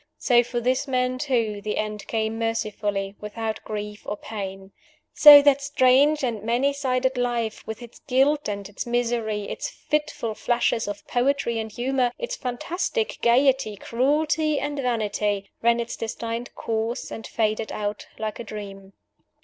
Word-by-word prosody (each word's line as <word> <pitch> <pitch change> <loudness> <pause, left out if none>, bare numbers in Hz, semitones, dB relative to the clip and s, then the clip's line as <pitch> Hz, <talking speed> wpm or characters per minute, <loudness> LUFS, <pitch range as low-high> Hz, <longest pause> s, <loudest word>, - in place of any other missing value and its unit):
So 240 -2 +4
for 240 0 -3
this 255 +4 0
man 255 -1 0
too 230 -7 0
the 210 +1 -3
end 210 -1 -3
came 220 0 -1
mercifully, 210 -3 -2
without 220 +1 -4
grief 210 0 -5
or 205 - -3
pain! 195 -3 -7 0.4
So 290 -1 +10
that 285 -1 +4
strange 280 +2 +4
and 230 -5 -1
many 240 +6 +1
sided 260 -2 0
life 235 -3 -1
with 220 +2 -6
its 235 - -13
guilt 280 +1 +2
and 200 -1 -4
its 205 +3 -6
misery, 235 -3 0
its - - -4
fitful 300 -7 -2
flashes 235 -1 0
of 205 0 -6
poetry 245 -2 +1
and 220 -1 -4
humor, 250 +2 0
its - - -4
fantastic 355 - -2
gayety, 255 -2 +3
cruelty, 295 +7 +1
and 290 0 -3
vanity 210 -5 -1
ran 235 0 +3
its 235 0 -3
destined 230 +1 -5
course, 225 +2 -3
and 225 - -6
faded 220 -1 -1
out 205 0 -4
like 215 -1 -4
a - - -4
dream! 195 -3 -9
235 Hz, 150 wpm, -24 LUFS, 215-260 Hz, 0.4 s, So